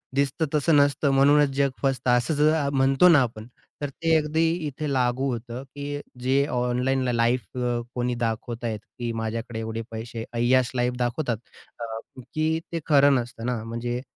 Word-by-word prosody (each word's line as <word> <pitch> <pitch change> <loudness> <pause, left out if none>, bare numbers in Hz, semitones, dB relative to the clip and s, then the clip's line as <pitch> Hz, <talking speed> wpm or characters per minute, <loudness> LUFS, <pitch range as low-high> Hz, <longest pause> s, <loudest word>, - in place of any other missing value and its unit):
"दिसतं 140 +3 +1
तसं 150 +1 +3
नसतं 145 0 +3
म्हणूनच 145 +1 +5
जग 140 0 +3
फसतं." 135 -2 0
असं 125 +5 +2
ज 150 0 +3
अ, 145 -3 +1
म्हणतो 135 +5 +4
ना 155 -5 +7
आपण. 110 -3 -4 0.3
तर 145 - -2
ते 165 +4 +1
अगदी 155 +1 +1 0.2
इथे 145 +1 -4
लागू 130 +1 +1
होतं, 120 +1 -5
की 145 +1 -6 0.2
जे 135 +2 +2
ऑनलाईन 125 +2 +1
ल - - +1
लाईफ 120 -1 0 0.4
कोणी 125 0 -1
दाखवत 115 0 -3
आहेत 110 -2 -2
की 120 +2 -6
माझ्याकडे 115 +1 -4
एवढे 110 0 -4
पैसे, 115 0 -6
अय्याश 120 +1 +2
लाईफ 125 0 +1
दाखवतात 120 0 -1 0.4
अ, - - -5 0.5
की 160 +1 +1
ते 170 - -2
खरं 140 -2 +5
नसतं 120 -2 -3
ना. 120 -3 -2
म्हणजे 120 +2 -3
125 Hz, 170 wpm, -25 LUFS, 120-140 Hz, 0.5 s, ना